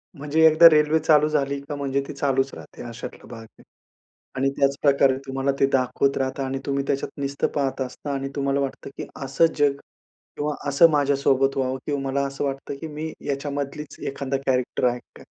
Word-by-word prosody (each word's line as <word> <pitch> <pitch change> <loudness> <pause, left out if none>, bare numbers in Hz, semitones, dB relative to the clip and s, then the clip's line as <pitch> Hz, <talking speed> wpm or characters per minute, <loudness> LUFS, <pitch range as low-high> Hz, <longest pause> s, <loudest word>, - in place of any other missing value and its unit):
म्हणजे 150 +2 +2
एकदा 160 +2 +8
रेल्वे 155 0 +3
चालू 150 -1 +4
झाली 140 -2 0
का 145 - -3
म्हणजे 140 -1 -1
ती - - -6
चालूच 135 -1 0
राहते - - -11
अशातला 115 0 -9
भाग 115 -2 -9
आहे. 115 - -19 0.7
आणि 135 +1 +1
त्याचप्रकारे 140 -1 +3
तुम्हाला 135 +1 0
ते - - +5
दाखवत 130 +1 +1
राहतं 135 +1 -2
आणि 135 0 -3
तुम्ही 140 -1 -1
त्याच्यात 140 - -1
नुसतं 140 0 -1
पाहत 135 -2 -1
असता 130 +3 -5
आणि 135 0 -3
तुम्हाला 140 0 0
वाटतं, 140 0 -4
की - - -5 0.2
असं 135 +5 +3
जग 145 -2 +3 0.6
किंवा 150 +1 -1 0.2
असं 165 +4 +6
माझ्यासोबत 140 -2 +2
व्हावं 130 0 0
किंवा 145 -2 -2
मला 135 +1 -1
असं 135 +1 -5
वाटतं, 135 0 -4
की 160 - -4
मी 155 +1 -5 0.2
याच्यामधलीच 140 +1 -4
एखादा 135 0 -2
कॅरेक्टर 125 -1 0
आहे 120 0 -4 0.2
का - - -13
140 Hz, 180 wpm, -24 LUFS, 135-145 Hz, 0.7 s, एकदा